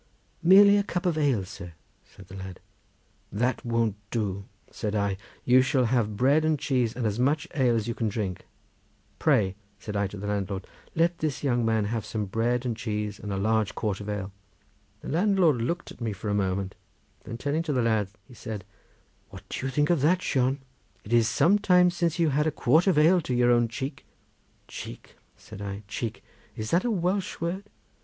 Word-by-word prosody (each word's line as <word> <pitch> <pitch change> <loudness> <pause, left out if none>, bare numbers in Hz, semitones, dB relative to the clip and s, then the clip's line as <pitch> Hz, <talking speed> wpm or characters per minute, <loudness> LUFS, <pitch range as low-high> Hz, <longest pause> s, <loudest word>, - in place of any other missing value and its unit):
"Merely 200 +3 +7
a 200 - +2
cup 180 -3 -3
of 175 -3 +2
ale, 135 -10 +1
sir," 90 -2 -9 0.3
said 95 - -16
the 95 - -11
lad. 95 -2 -8 0.7
"That 120 +4 0
won't 115 -3 0
do," 100 -4 -2 0.3
said 105 0 -3
I; 100 -2 +1 0.3
"you 125 +1 +6
shall 130 0 +2
have 110 -3 0
bread 140 +6 +4
and 155 -1 +2
cheese 125 -5 0
and 125 -1 -2
as 105 +1 -1
much 145 +4 +1
ale 125 -5 +2
as 110 -1 -1
you 115 - -1
can 115 -1 -1
drink. 100 -4 -4 0.7
Pray," 95 -3 +3 0.2
said 105 - -7
I 100 -1 +1
to 100 - -9
the 100 - -6
landlord, 100 -2 -2 0.3
"let 170 +1 +2
this 145 -3 -2
young 120 -4 +1
man 110 -2 +1
have 110 +1 -2
some 105 0 -3
bread 115 +5 0
and 120 -2 -1
cheese 105 -2 -3
and 105 - -6
a 95 - -1
large 110 +1 +1
quart 105 -3 -2
of 105 - -6
ale." 100 -2 -3 0.7
The - - -7
landlord 180 -4 +3
looked 170 +10 -3
at - - -14
me 115 -2 -1
for 100 +2 -5
a - - 0
moment, 95 -1 -1 0.5
then 115 - -6
turning 145 +6 -1
to 165 -2 -3
the 125 -3 +1
lad 110 -3 +1 0.2
he - - -15
said: 105 -4 -7 0.6
"What - - -12
do - - -4
you - - -3
think 145 +4 +2
of 170 -6 +2
that, 180 +5 +3
Shon? 130 +1 +1 0.4
It 110 - -5
is 115 -1 +4
some 185 +9 +4
time 180 -3 +5
since 170 -1 -1
you 165 -2 +3
had 150 +2 +1
a - - +1
quart 155 +5 +3
of 185 - +3
ale 170 +4 +5
to 130 -5 -2
your 120 0 +4
own 120 -1 +4
cheek." 135 +5 -6 0.6
"Cheek," - - -9 0.2
said 100 - -11
I, 100 +1 -5
"cheek! 110 +2 -4 0.3
Is 110 0 -5
that 175 +5 +2
a - - +1
Welsh 190 -1 -1
word? 175 +4 -3
120 Hz, 205 wpm, -27 LUFS, 105-155 Hz, 0.7 s, Merely